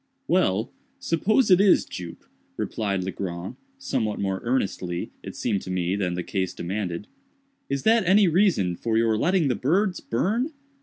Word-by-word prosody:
"Well, 115 - +1 0.3
suppose 210 +7 +2
it 185 +1 +7
is, 200 -2 +5
Jup," 85 -2 -8 0.3
replied 100 -4 -2
Legrand, 90 -1 -5 0.2
somewhat 115 - -2
more 95 -1 -1
earnestly, 95 -8 -2
it - - -8
seemed 100 - -1
to - - -9
me, 90 0 0
than 90 -3 -1
the 90 - -3
case 95 -1 -2
demanded, 90 0 -3 0.6
"is 140 -1 -2
that 225 0 +4
any 195 +1 +6
reason 165 - +2
for 110 +4 -1
your 115 -1 +3
letting 170 - +2
the 130 - +2
birds 180 - +1
burn? 225 - -1
110 Hz, 155 wpm, -25 LUFS, -, 0.6 s, it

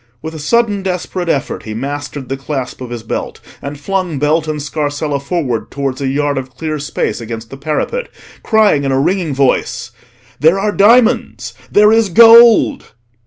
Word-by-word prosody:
With 160 0 -6
a 160 - -8
sudden 210 +6 +1
desperate 180 -1 -3
effort 145 -2 -2
he 110 -1 -7
mastered 145 +2 -5
the 135 - -3
clasp 135 -2 -5
of 125 - -6
his 120 -2 -6
belt, 110 - -5 0.2
and 140 0 -7
flung 185 -1 -2
belt 155 +3 0
and 155 -1 -3
scarsella 145 0 -3
forward 140 - -3
towards 140 -1 -4
a 135 - -1
yard 145 +1 0
of 130 -1 -10
clear 155 -2 -3
space 140 -3 -3
against 115 0 -7
the - - -7
parapet, 155 - -3 0.3
crying 215 -10 +2
in 135 - -1
a 135 - +1
ringing 170 -1 0
voice— 125 -3 0 0.5
"There 165 +6 +3
are 210 +1 0
diamonds! 205 - +2 0.2
there 210 +1 +5
is 225 -2 +3
gold!" 230 - +6
150 Hz, 170 wpm, -15 LUFS, 135-190 Hz, 0.5 s, gold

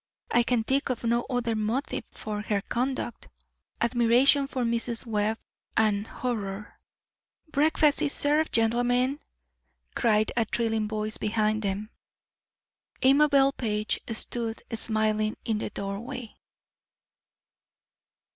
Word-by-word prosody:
I 240 - +5
can 240 -1 +1
think 275 +5 0
of 250 -2 -2
no 235 +1 +1
other 245 -3 0
motive 220 +6 -2
for 210 -1 -5
her 210 -1 -1
conduct. 250 0 -3 0.5
Admiration 245 +4 +4
for 260 -2 -2
Mrs. 235 +1 +1
Webb 215 -1 0 0.4
and 210 -1 +2
horror 210 -5 -4 0.3
" 310 - -37
"Breakfast 300 0 +3
is 285 - +1
served, 300 +2 +2
gentlemen!" 245 +4 +2 0.7
cried 215 -2 +2
a 230 -2 +2
thrilling 225 -1 0
voice 215 0 -3
behind 215 0 0
them. 205 +2 -3 1.1
Amabel 275 0 +5
Page 215 -5 -1
stood 225 0 -3
smiling 215 -1 +1
in 220 -2 0
the - - -3
doorway. 210 +4 -6
230 Hz, 110 wpm, -27 LUFS, 215-255 Hz, 1.1 s, I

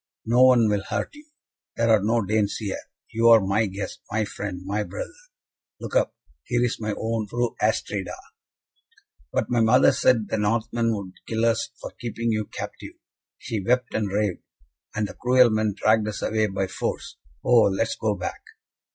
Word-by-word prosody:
"No 120 +3 +4
one 125 -3 +5
will 105 -1 +1
hurt - - -2
you. 295 +1 -15 0.5
There 115 0 +2
are 110 -2 +5
no 115 0 +1
Danes 105 0 +1
here. 105 -3 -4 0.3
You 115 +1 +2
are 115 -1 +9
my 100 +2 +1
guest, 100 +1 -6
my 110 0 0
friend, 95 -3 -6
my 100 +2 -1
brother. 100 - -6 0.7
Look - - -6
up! - - +2 0.3
here 120 -1 0
is 120 - -2
my 105 -2 -2
own 110 -1 -2
Fru 120 +2 -2
Astrida." - - -1 1.2
"But - - -1
my 120 -1 +3
mother 115 +3 +5
said 110 -5 +2
the 110 - -1
Northmen 115 +2 0
would 95 -3 -7
kill 115 0 0
us 115 -1 +1
for - - -7
keeping 115 -1 -2
you 110 -1 -1
captive. - - -8 0.4
She 105 -4 -4
wept 125 +3 +1
and 110 -2 0
raved, 100 -1 -1 0.5
and 105 -1 0
the - - -9
cruel 125 -1 +4
men 110 -2 0
dragged 110 0 +3
us 105 -1 -4
away 110 -1 +1
by 95 -1 -1
force. 95 - -4 0.3
Oh, 120 -2 +6
let 100 +4 0
us - - -2
go 105 -2 -1
back!" 90 - -5
110 Hz, 180 wpm, -24 LUFS, 105-115 Hz, 1.2 s, are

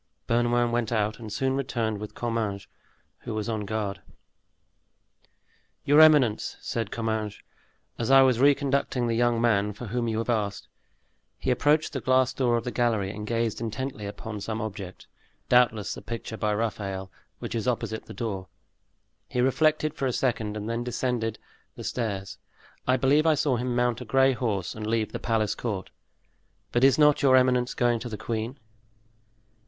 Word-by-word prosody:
Bernouin 120 0 +2
went 120 -1 -1
out 105 -1 0
and 110 -2 -8
soon 130 +4 0
returned 115 -6 -2
with 105 0 -8
Comminges, 110 -4 -2 0.5
who 115 - -6
was 105 -1 -2
on 110 -2 -2
guard. 100 -2 -3 1.8
"Your 145 +2 +6
eminence," 145 -9 +4
said 115 -3 -3
Comminges, 110 -2 -3 0.6
"as 115 - -1
I 135 0 +8
was 130 -3 +3
re 140 +2 +6
conducting 140 -3 0
the 115 - 0
young 120 0 +2
man 105 -3 +2
for 110 +5 -8
whom 120 +2 -2
you 110 -1 -1
have 115 - -2
asked, 105 -3 -2 0.7
he - - -1
approached 150 +6 +2
the 135 - -3
glass 130 +2 +3
door 120 -3 +2
of 115 - -3
the 125 - -3
gallery, 110 -6 0
and 105 0 -7
gazed 115 -1 -1
intently 115 -1 -4
upon 105 +1 -6
some 110 +2 -3
object, 100 -4 -6 0.4
doubtless 115 -5 +3
the - - -8
picture 115 -1 -6
by 105 -1 -1
Raphael, 100 -3 -3 0.3
which - - -6
is 115 -1 -2
opposite 110 -2 -2
the - - -11
door. 100 -6 -4 0.8
He 125 - -2
reflected 155 +4 +2
for 135 - -2
a - - 0
second 110 -5 -1
and 105 0 -5
then 115 +1 -2
descended 120 -2 -2 0.4
the - - -8
stairs. 100 -5 -3 0.5
I 130 0 +4
believe 145 +5 +3
I 160 - +5
saw 140 -2 +1
him 125 +1 -2
mount 120 0 +1
a - - -6
gray 135 +3 +4
horse 105 -7 -2
and 110 -1 -6
leave 110 -1 0
the - - -4
palace 110 -2 0
court. 105 -6 -4 0.8
But 120 - +1
is 135 -2 +6
not 150 -1 +5
your 130 -2 +5
eminence 125 -1 +3
going 120 -1 +2
to 120 - -6
the 110 - -5
queen?" 115 +4 -4
115 Hz, 175 wpm, -26 LUFS, 110-125 Hz, 1.8 s, I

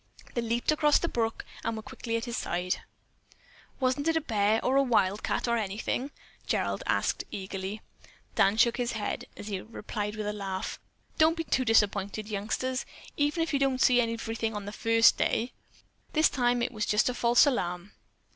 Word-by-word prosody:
They 240 - 0
leaped 235 +4 0
across 300 -1 +4
the 340 - -1
brook 225 -6 -2 0.2
and 230 -1 -2
were 220 - -6
quickly 230 +1 -3
at 230 - -4
his 240 -1 -4
side. 180 -3 -2 1.0
"Wasn't 260 +3 +1
it 325 0 +3
a - - +1
bear, 215 -4 +2
or 260 - +2
a 275 - +6
wildcat, 210 -4 +1
or 235 0 +2
anything?" 220 +5 -2 0.4
Gerald - - 0
asked - - +1
eagerly. 195 +2 -5 0.5
Dan 195 +2 +3
shook 235 +1 +4
his 245 -1 -1
head, 215 -2 -3
as 205 - -8
he 195 -2 -3
replied 210 -1 -5
with 215 -1 -4
a 210 - -1
laugh: 195 -1 -4 0.4
"Don't 320 +1 +5
be 330 - -1
too 265 -4 +1
disappointed, 210 -2 +2
youngsters, 220 +5 -2 0.3
even 295 +3 +1
if 325 - -3
you 280 - +2
don't 270 -2 +1
see 250 -1 +5
everything 225 -1 -2
on 205 -1 -5
the 205 - -5
first 230 +1 +4
day. 240 +3 0 0.6
This 310 0 +5
time 245 -1 +1
it - - -1
was 215 -3 -2
just 210 - +3
a 250 - +1
false 240 +1 +5
alarm." 180 -8 -1
230 Hz, 185 wpm, -29 LUFS, 210-255 Hz, 1.0 s, a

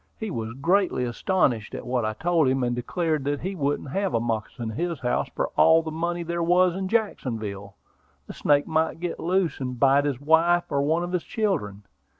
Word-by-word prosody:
He 220 -3 -4
was 115 -5 -4
greatly 175 +2 +1
astonished 120 - 0
at - - -7
what 125 -2 -1
I 110 - -1
told 165 +4 +1
him, 130 0 +1
and 120 0 0
declared 155 +4 -1
that 145 0 -1
he 190 +3 -3
wouldn't 145 -4 -2
have 195 -1 -1
a - - +3
moccasin 115 0 -3
in - - -8
his 170 -4 -2
house 125 - 0
for - - -1
all 165 0 +5
the 160 - -5
money 170 +2 -2
there 170 +1 -3
was 180 +1 +3
in 190 0 -3
Jacksonville; 110 - -2 0.5
the - - -9
snake 145 -1 +2
might 160 +1 0
get 175 0 -4
loose, 180 -2 0
and 125 -2 -4
bite 140 +2 +4
his 140 -4 -1
wife 165 +4 +3
or 140 - +1
one 160 +4 +1
of 175 - -4
his 180 -2 0
children. 105 - -2
155 Hz, 205 wpm, -25 LUFS, 125-175 Hz, 0.5 s, all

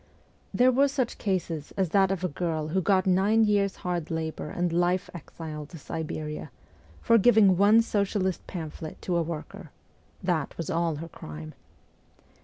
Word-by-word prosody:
There 250 +1 +4
were 275 +3 +4
such 265 -3 -2
cases 170 -6 -2
as 190 -3 +1
that 195 +1 +4
of 190 -2 -2
a - - +2
girl 160 -1 -2
who 190 +4 +1
got 185 +1 +2
nine 195 +4 +4
years' 200 -2 +2
hard 175 -3 -2
labour 160 -1 -3
and 175 0 -1
life 175 +1 +1
exile 155 -3 -8
to 165 - -11
Siberia, 155 0 -5 0.5
for 230 0 +5
giving 210 -3 +6
one 210 +5 +5
socialist 200 -4 -1
pamphlet 160 -2 -7
to 180 - -1
a 170 - +3
worker: 165 +2 -6 0.5
that 175 -5 -1
was 165 - -3
all 165 -1 0
her 160 +3 -6
crime. 75 - -9
180 Hz, 160 wpm, -27 LUFS, 160-200 Hz, 0.5 s, giving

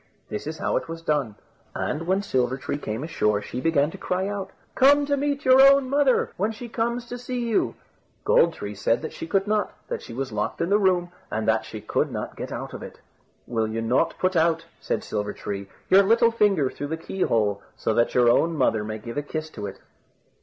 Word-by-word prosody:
This 105 - -5
is 160 +1 -4
how - - 0
it - - -4
was 165 0 -7
done; 145 -9 0 0.4
and 165 +3 -2
when 190 +2 +1
Silver 130 -7 0
tree 140 +2 -4
came 110 0 -4
ashore, 105 -10 +1
she 120 +4 -6
began 150 -1 +2
to - - -10
cry 185 +1 -1
out: 200 -1 -4 0.2
"Come 285 +2 +5
to 285 0 +1
meet 285 +1 -1
your 260 +1 +7
own 275 -1 +6
mother, 280 -3 +3
when 210 +4 0
she 235 +2 -8
comes 235 +1 -1
to 245 +1 -7
see 245 -1 -3
you," 225 - +1 0.5
Gold 170 -1 +4
tree 105 0 -6
said 110 +6 0
that 160 - -5
she 165 - -6
could 195 +2 +1
not, 210 0 0 0.2
that - - -3
she - - -10
was 130 +1 -4
locked 105 0 -2
in 170 - 0
the 205 - +5
room, 180 -3 +2 0.2
and 110 0 -2
that 110 0 +2
she 110 - -8
could 110 - -1
not - - -5
get - - -6
out - - -5
of - - -7
it. - - -10 0.5
"Will 110 -2 -1
you 110 +1 -3
not 120 +3 +1
put 185 0 0
out," 165 0 +2
said - - -2
Silver 105 -1 -3
tree, 100 -1 -6 0.2
"your 190 +1 +7
little 230 +3 +4
finger 195 - +2
through 145 - -5
the 160 +2 -3
key 185 +3 -6
hole, 105 - +1 0.2
so 110 - 0
that 120 +2 +1
your 125 -1 +5
own 165 +7 +3
mother 110 -5 +2
may 110 +1 -4
give 115 +4 -8
a - - +1
kiss 155 +2 -5
to 105 -2 -6
it?" 95 - -10
165 Hz, 230 wpm, -25 LUFS, -, 0.5 s, your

